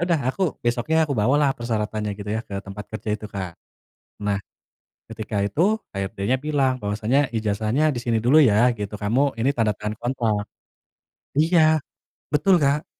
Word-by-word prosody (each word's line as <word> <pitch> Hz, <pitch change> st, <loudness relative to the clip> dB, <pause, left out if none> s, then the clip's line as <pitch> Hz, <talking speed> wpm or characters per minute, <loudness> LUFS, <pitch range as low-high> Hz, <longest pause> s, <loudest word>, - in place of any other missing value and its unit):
udah 170 Hz, -2 st, +3 dB
aku 195 Hz, -, -3 dB, 0.2 s
besoknya 120 Hz, +6 st, +1 dB
aku 150 Hz, -, -3 dB
bawalah 140 Hz, +5 st, +3 dB
persyaratannya 110 Hz, -3 st, -2 dB
gitu 105 Hz, 0 st, -6 dB
ya -, -, -1 dB
ke 100 Hz, -, -6 dB
tempat 100 Hz, +1 st, -7 dB
kerja 110 Hz, 0 st, -7 dB
itu, 105 Hz, -, -6 dB
Kak. 95 Hz, -4 st, -5 dB, 0.7 s
Nah, 100 Hz, -1 st, 0 dB, 0.7 s
ketika 110 Hz, -1 st, -5 dB
itu 100 Hz, +8 st, -2 dB, 0.3 s
HRD-nya 100 Hz, +4 st, -1 dB
bilang 135 Hz, -3 st, 0 dB
bahwasanya, 110 Hz, +7 st, +1 dB
"Ijazahnya 110 Hz, +8 st, +1 dB
di 120 Hz, -, -3 dB
sini 120 Hz, -1 st, 0 dB
dulu 140 Hz, +6 st, +6 dB
ya," 120 Hz, -2 st, +5 dB
gitu, 105 Hz, -2 st, -5 dB
"kamu 115 Hz, +6 st, +1 dB
ini 120 Hz, +5 st, +1 dB
tanda 110 Hz, -6 st, 0 dB
tangan 105 Hz, 0 st, -4 dB
kontrak." 115 Hz, -4 st, -1 dB, 0.9 s
Iya, 160 Hz, -1 st, +4 dB, 0.5 s
betul, 180 Hz, +6 st, +4 dB
Kak. 145 Hz, 0 st, +1 dB
115 Hz, 150 wpm, -23 LUFS, 105-140 Hz, 0.9 s, dulu